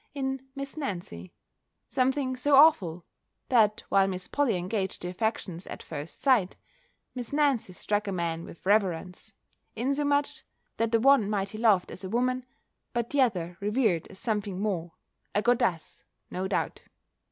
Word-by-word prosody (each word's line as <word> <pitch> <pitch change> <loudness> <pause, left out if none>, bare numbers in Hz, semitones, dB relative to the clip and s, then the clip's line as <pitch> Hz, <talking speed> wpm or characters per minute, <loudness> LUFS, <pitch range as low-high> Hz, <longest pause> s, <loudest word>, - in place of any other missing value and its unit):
in 265 -1 -3
Miss 275 +2 -6
Nancy, 175 - -5 0.6
something 260 0 +1
so 280 +3 +3
awful; 190 - +5 0.4
that 215 -4 +3
while 195 -1 +4
Miss 185 -1 -3
Polly 280 -7 +1
engaged 190 +1 -3
the 180 - -3
affections 185 -3 -3
at - - -8
first 150 0 -7
sight, 240 -9 +3 0.6
Miss 245 -2 -6
Nancy 285 -9 +1
struck 205 +3 -2
a - - -1
man 170 -2 -2
with 170 - -12
reverence; 190 0 0 0.4
insomuch, 285 +4 0 0.4
that 230 0 0
the 230 - +4
one 260 -4 +5
might 200 -2 -1
he 215 - -8
loved 210 -6 +3
as 185 - -8
a 190 - -5
woman, 250 +3 0 0.5
but 235 -1 -2
the 285 - +3
other 180 -8 0
revered 210 -5 +1
as 190 - -13
something 205 -3 -2
more: 175 -5 -2 0.4
a 205 - +2
goddess, 190 -9 0 0.3
no 185 +1 -2
doubt! - - -2
215 Hz, 150 wpm, -28 LUFS, 185-255 Hz, 0.6 s, awful